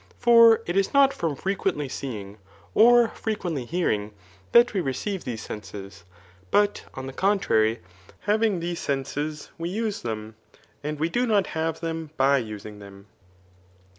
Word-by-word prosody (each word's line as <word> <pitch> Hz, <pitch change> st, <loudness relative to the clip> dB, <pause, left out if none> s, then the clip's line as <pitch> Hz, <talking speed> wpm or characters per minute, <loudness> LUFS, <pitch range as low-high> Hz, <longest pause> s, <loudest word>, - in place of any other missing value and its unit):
For 230 Hz, -1 st, +6 dB
it 175 Hz, -, -3 dB
is 195 Hz, +7 st, +1 dB
not 275 Hz, -1 st, +6 dB
from 160 Hz, -4 st, -2 dB
frequendy 190 Hz, -4 st, -2 dB
seeing, 105 Hz, -7 st, -6 dB, 0.3 s
or 235 Hz, +1 st, +6 dB
frequently 180 Hz, -, -3 dB
hearing, 110 Hz, -10 st, -1 dB, 0.4 s
that 235 Hz, -1 st, +6 dB
we 195 Hz, -, +1 dB
recdve 175 Hz, +8 st, -3 dB
these 115 Hz, -3 st, -5 dB
senses, 100 Hz, -2 st, -9 dB, 0.4 s
but, 205 Hz, -, +2 dB
on 130 Hz, -, -6 dB
the 135 Hz, -, -7 dB
contrary, 120 Hz, -, +2 dB, 0.4 s
having 210 Hz, -2 st, +1 dB
these 170 Hz, 0 st, -3 dB
senses 145 Hz, +2 st, -3 dB
we 165 Hz, +1 st, -3 dB
xise 220 Hz, -2 st, -2 dB
them, 110 Hz, -1 st, -5 dB, 0.5 s
and 150 Hz, +1 st, -3 dB
we 160 Hz, -, +1 dB
do 245 Hz, +8 st, 0 dB
not 205 Hz, -4 st, +3 dB
have 160 Hz, 0 st, -2 dB
themby 155 Hz, -5 st, 0 dB
using 105 Hz, -1 st, -9 dB
them. 100 Hz, -1 st, -13 dB
160 Hz, 140 wpm, -25 LUFS, -, 0.5 s, For